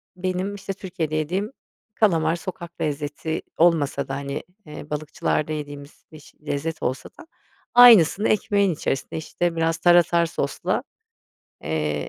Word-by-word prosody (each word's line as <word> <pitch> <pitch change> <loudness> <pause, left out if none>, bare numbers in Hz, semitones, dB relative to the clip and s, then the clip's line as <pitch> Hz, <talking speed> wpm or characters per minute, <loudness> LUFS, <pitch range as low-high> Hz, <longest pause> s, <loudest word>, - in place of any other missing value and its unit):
benim, 185 +2 -2
işte, 195 0 -5
Türkiye'de 175 -5 -4
yediğim 180 - -2 0.4
kalamar. 165 -8 +2
Sokak 170 -1 -8
lezzeti 150 +2 -3 0.2
olmasa 150 -5 +2
da, 135 - -3
hani, 140 +1 -5 0.2
eee, 150 -1 -10
balıkçılarda 150 0 -2
yediğimiz 145 -1 -8
biş 155 -1 -15
lezzet 155 +3 -3
olsa 130 +1 -3
da 335 - -12 0.5
aynısını 220 -6 +7
ekmeğin 200 -3 +2
içerisinde, 135 -2 -3
işte, 170 +2 -2
biraz 165 0 0
tarator 170 0 +4
sosla, 165 - -2 0.8
eee, 75 -2 -2
160 Hz, 125 wpm, -23 LUFS, 145-185 Hz, 0.8 s, aynısını